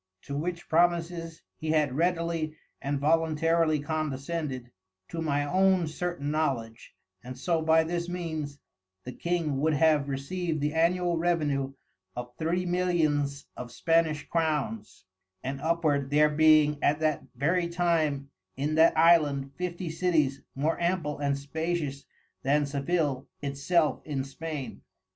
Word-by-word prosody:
To 140 - -5
which 170 +4 -3
promises 170 0 +1
he 160 - -5
had 150 -4 +2
readily 165 -1 0 0.3
and 140 0 -1
voluntarily 165 +1 +2
condescended, 145 -3 -3 0.4
to 165 - -4
my 145 -2 0
own 185 +2 +3
certain 155 -2 -3
knowledge, 125 -7 -2 0.3
and 125 +1 -8
so 165 +4 0
by 160 0 +4
this 170 +1 -3
means, 160 -5 -4 0.5
the 125 - -6
King 165 -2 -1
would 155 0 +2
have 150 -2 +3
received 155 +4 -2
the 150 +1 -1
Annual 175 +1 +2
Revenue 150 -6 0 0.4
of 120 0 -6
Three 170 +3 0
Millions 155 -6 0
of 120 -1 -7
Spanish 160 +3 +1
Crowns, 145 - -2 0.4
and 135 +1 -4
upward, 155 -4 +1
there 150 +1 +4
being 150 -1 +5
at 150 +1 +2
that 155 -2 +1
very 170 +7 +1
time 160 -5 0 0.3
in 145 +3 -1
that 160 +2 +5
Island 150 -5 +4
Fifty 175 -1 -4
Cities 155 -6 +1
more 155 +5 0
ample 170 -5 0
and 140 -1 0
spacious 150 -1 -3 0.4
than 145 +2 +2
Sevil 140 -1 -1
it 140 -1 -4
self 155 +2 +1
in 140 -3 -3
Spain. 140 0 -6
155 Hz, 135 wpm, -28 LUFS, 140-170 Hz, 0.5 s, being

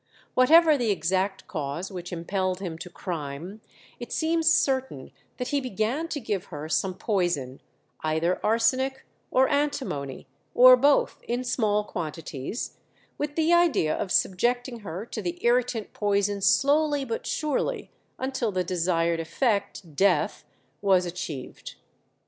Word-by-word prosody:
Whatever 310 +3 +6
the 235 -3 0
exact 190 +2 0
cause 155 +1 -4
which 180 -2 -7
impelled 185 +2 -2
him 180 -4 -5
to 180 - -8
crime, 170 +3 -6 0.4
it 240 - -8
seems 325 0 +2
certain 260 - 0 0.3
that 250 - -3
he 285 -1 +1
began 250 - -2
to 310 - -4
give 205 -6 -3
her 150 -2 -7
some 185 +3 0
poison, 175 - -1 0.4
either 160 +3 0
arsenic 255 +5 +1 0.2
or 260 +1 +4
antimony, 265 - -2 0.3
or 255 +1 +9
both, 280 +3 +2
in 245 +1 -1
small 215 -4 +1
quantities, 160 - -5 0.4
with 295 0 -3
the 325 +1 +3
idea 320 - +3
of 190 - -3
subjecting 240 +5 +1
her 195 0 -6
to - - -6
the 350 0 -3
irritant 240 -2 +1
poison 205 -1 0
slowly 290 +4 +3
but 230 -2 -4
surely 305 - -2 0.3
until 260 -4 -2
the 185 -1 0
desired 170 -1 0
effect, 200 - -2
death, 180 -3 +2 0.4
was 190 -3 +3
achieved. 170 -7 -6
205 Hz, 130 wpm, -26 LUFS, 175-260 Hz, 0.4 s, or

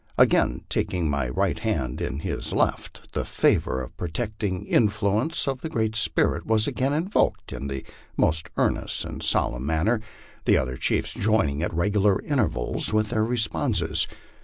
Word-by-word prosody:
Again - - +3
taking 90 -3 -1
my 70 -3 -1
right 60 - 0
hand 65 -1 -2
in 70 - -3
his - - -3
left, - - -2
the - - -1
favor 65 0 +1
or - - -6
protecting 100 +2 -3
influence 110 +8 +1
of 135 -2 -2
the 160 - -4
Great 110 -5 -1
Spirit 110 - +2
was 110 -1 +4
again 135 +2 0
invoked 165 +7 0
in 65 +3 -5
the 70 -1 -5 0.3
most 80 +1 +1
earnest - - 0
and - - -7
solemn 60 +3 0
manner, 95 +9 +1 0.4
the - - +5
other 65 -1 -1
chiefs - - 0
joining 100 -9 +1
at 85 - -1
regular 100 +3 +2
intervals 115 - +1
with 110 0 +1
their 110 -2 +1
responses. 115 0 0
105 Hz, 155 wpm, -25 LUFS, 75-110 Hz, 0.4 s, the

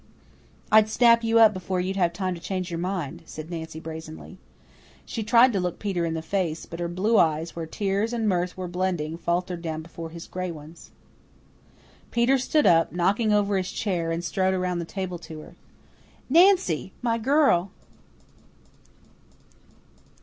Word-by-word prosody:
"I'd 215 0 +6
snap 235 +1 +4
you 225 0 +2
up 220 -2 +7
before 185 0 -3
you'd 185 +2 -2
have 175 -3 +2
time 185 0 -2
to 170 - -9
change 185 -1 -4
your 165 - -3
mind," 180 -5 -3
said 155 +2 -8
Nancy 160 -1 -6
brazenly. 160 +3 -9 0.7
She 230 - -4
tried 235 +3 +5
to 195 - +1
look 180 -1 -2
Peter 190 -5 -2
in 165 - -2
the 160 - -4
face, 170 -3 -2
but 170 - -9
her 175 - -1
blue 195 +6 +2
eyes, 160 +1 +1
where 165 -1 -5
tears 200 +5 -1
and 230 -2 -1
mirth 180 -2 0
were 185 -1 -4
blending, 175 -3 -2
faltered 175 +1 -2
down 160 -1 -4
before 165 0 -8
his 165 0 -9
gray 185 0 -4
ones. 160 0 -11 1.2
Peter 245 +3 +2
stood 300 +4 +1
up, 165 -1 +4
knocking 195 +6 +1
over 205 -1 +2
his 185 0 -2
chair, 175 -5 -2
and 165 +1 -2
strode 190 +2 0
around 180 -1 -1
the 170 - -4
table 185 -1 -5
to 160 -2 -9
her. - - -14 0.8
"Nancy, 335 - +4
my 230 -1 +1
girl!" 255 - +3
180 Hz, 165 wpm, -25 LUFS, 170-210 Hz, 1.2 s, up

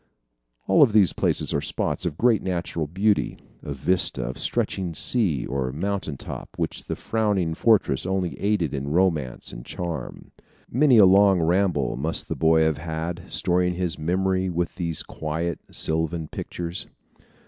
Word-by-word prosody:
All 95 +8 +6
these 105 -6 +4
places - - 0
are - - +1
spots 90 - -2
of 75 -3 -5
great 120 -3 +3
natural 85 -3 -2
beauty 100 +6 +1 0.2
a 75 - -7
vista 90 +7 +1
of - - -5
stretching 90 -4 -1
sea 90 - +1
or 65 -1 -2
mountain 85 -1 -3
top - - -7
which - - -2
the - - -3
frowning 105 -7 0
fortress 100 - +2
only 95 -2 -1
aided 100 -8 0
in 70 0 -3
romance 80 -6 0
and - - -8
charm. 85 0 -6 0.4
Many 130 0 +5
a 105 - +9
long 95 0 +5
ramble 85 -6 +1
must 80 +5 -2
the - - -2
boy 80 0 +3
have 80 -2 +1
had, 80 +2 -4
storing 90 0 +1
his 90 -4 -2
memory 95 +3 0
with 85 0 -2
these 85 -3 -2
quiet, 80 +1 -3
sylvan 80 0 -1
pictures. 85 +1 -5
85 Hz, 150 wpm, -24 LUFS, 80-95 Hz, 0.4 s, a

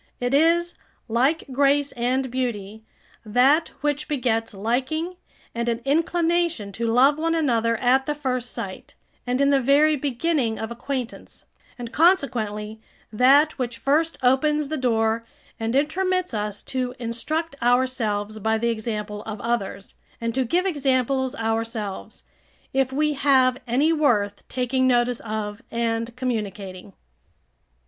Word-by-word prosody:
It 245 +1 -1
is, 335 +4 +3 0.3
like 260 +8 +1
grace 280 +2 +2
and 255 +2 -1
beauty, 220 -4 -3 0.4
that 260 +9 +3
which 295 0 -1
begets 240 -6 -1
liking 260 - -2 0.4
and 235 0 -1
an 230 -1 -1
inclination 330 -5 +1
to 230 +3 -3
love 265 +6 +4
one 330 +1 +1
another 230 -7 +1
at 260 +3 +2
the 295 - -1
first 255 -4 -2
sight, - - -7 0.3
and 250 +1 0
in 280 0 +4
the 275 -1 +3
very 290 +4 +4
beginning 270 -3 -1
of 220 +1 -5
acquaintance; 250 0 -6 0.3
and, 240 -2 -7
consequently, 220 - +1 0.3
that 275 +7 +4
which 245 -2 -3
first 315 +4 +1
opens 290 +3 +2
the 315 - -2
door 225 -3 +1 0.4
and 225 +2 -1
intromits 365 +4 0
us 210 -1 -3
to 255 -1 -3
instruct 280 +7 -3
ourselves 235 -4 0
by 220 +2 +1
the 235 +1 0
example 215 -2 -3
of 215 -1 -6
others, 200 -4 -3 0.3
and 230 0 -2
to 260 +1 +1
give 355 +10 +1
examples 265 -5 0
ourselves, 225 - -3 0.5
if 265 -1 +1
we 300 +2 +1
have 260 -2 +3
any 280 +7 +2
worth 210 -10 +1
taking 260 +1 0
notice 245 -1 +2
of 210 -1 -5
and 230 0 -2
communicating. 205 -6 -4
250 Hz, 135 wpm, -24 LUFS, 225-285 Hz, 0.5 s, love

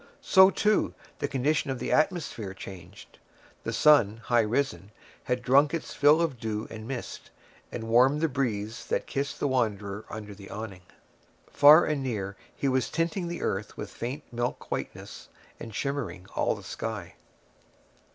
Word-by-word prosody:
So, 190 -9 +7
too, 210 +1 +1 0.2
the - - 0
condition 140 +2 0
of 130 - -1
the - - -3
atmosphere 155 - 0
changed. 95 0 -11 0.4
The 115 - -3
sun, 115 -4 +5
high 120 0 +3
risen, 105 -5 -1 0.4
had 125 -1 -1
drunk 140 +5 +4
his 165 - -4
fill 150 +4 +5
of 145 -8 -2
dew 110 -1 -3
and 110 0 -8
mist, 130 -2 -6 0.4
and 115 - -5
warmed 125 +6 +4
the 165 - +3
breeze 115 -6 -3
that - - -1
kissed 140 0 -3
the - - +1
wanderer 105 -5 -1
under 105 -1 -7
the 100 0 -12
awning; 100 -3 -7 0.7
far 150 +4 +8
and 150 -2 -1
near 105 -7 -3 0.2
he 140 - -1
was 130 -1 +1
tinting 170 +2 -1
the 170 0 -5
earth 95 +2 -3
with - - -6
faint 135 +5 -5
milk 120 +1 -3
whiteness, - - -6 0.3
and 115 -2 -8
shimmering 120 -12 -3
all - - +1
the - - -11
sky. 110 -6 -5
125 Hz, 160 wpm, -28 LUFS, 105-145 Hz, 0.7 s, far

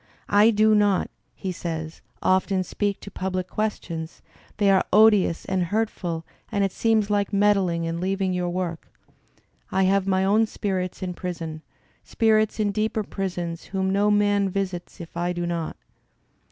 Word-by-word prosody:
"I 205 +2 +6
do 215 0 +4
not," 205 -2 +2 0.2
he 190 - -4
says, 160 -2 -5 0.2
"often 185 0 +2
speak 200 +2 -2
to 200 - -9
public 185 -1 -3
questions; 170 -7 -4 0.3
they 200 -1 +4
are 190 - +4
odious 210 -5 +5
and 190 -2 0
hurtful 180 -5 -2 0.3
and 200 - +1
it 195 - +1
seems 220 -1 +1
like 205 -1 +1
meddling 195 -5 +2
and 165 0 -3
leaving 190 0 0
your 180 -1 -1
work. 175 -2 -3 0.8
I 190 0 +2
have 195 +1 +2
my 190 0 +2
own 215 +3 +3
spirits 185 -4 -3
in 180 -1 -3
prison; 165 -3 -5 0.4
spirits 220 -2 +2
iq 210 -2 0
deeper 215 +1 0
prisons, 175 -4 -4
whom 190 0 -1
no 200 +2 +3
man 205 -1 +3
visits 185 -2 -4
if 170 -1 -10
I 175 +1 -1
do 175 0 -3
not." 170 -2 -3
190 Hz, 155 wpm, -24 LUFS, 175-205 Hz, 0.8 s, I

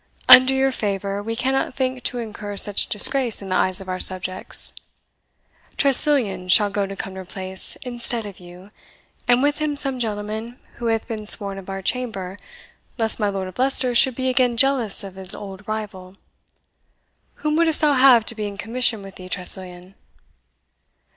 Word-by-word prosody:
Under 255 +1 +7
your 265 0 0
favour, 200 -3 -4
we 225 +2 -6
cannot 260 +1 -2
think 260 -1 -3
to 245 - -2
incur 210 -3 -8
such 205 0 +3
disgrace 240 +2 +2
in 195 - -9
the 185 - -2
eyes 185 0 0
of 195 - -11
our 185 0 -5
subjects. 185 0 +1 1.0
Tressilian 250 -10 +2
shall 205 +2 +3
go 200 -1 -3
to 195 - -9
Cumnor 190 -1 -8
Place 185 0 -2
instead 240 -2 -2
of 200 -3 -11
you, 180 +3 -16 0.6
and 245 +2 +2
with 290 +1 -1
him 300 -1 -3
some 270 -3 +6
gentleman 220 +1 -6 0.2
who 235 - -5
hath 225 -1 -2
been 215 -3 -5
sworn 200 -2 +2
of 195 - -13
our 195 0 -7
chamber, 195 -6 -4 0.6
lest 225 -1 +1
my 210 -2 -1
Lord 195 -1 -5
of 185 - -13
Leicester 260 -1 +2
should 255 +1 +3
be 260 +1 -4
again 250 -2 0
jealous 245 -5 +4
of 195 -2 -10
his 190 0 +6
old 200 -1 -11
rival. 205 -4 -7 1.3
Whom 300 0 0
wouldst 325 -1 +1
thou 300 -2 +2
have 255 -4 +4
to 235 - -4
be 215 -2 -6
in 200 -1 -10
commission 225 0 -2
with 195 -1 -13
thee, 185 0 -12
Tressilian?" 180 0 +1
215 Hz, 175 wpm, -20 LUFS, 195-255 Hz, 1.3 s, Under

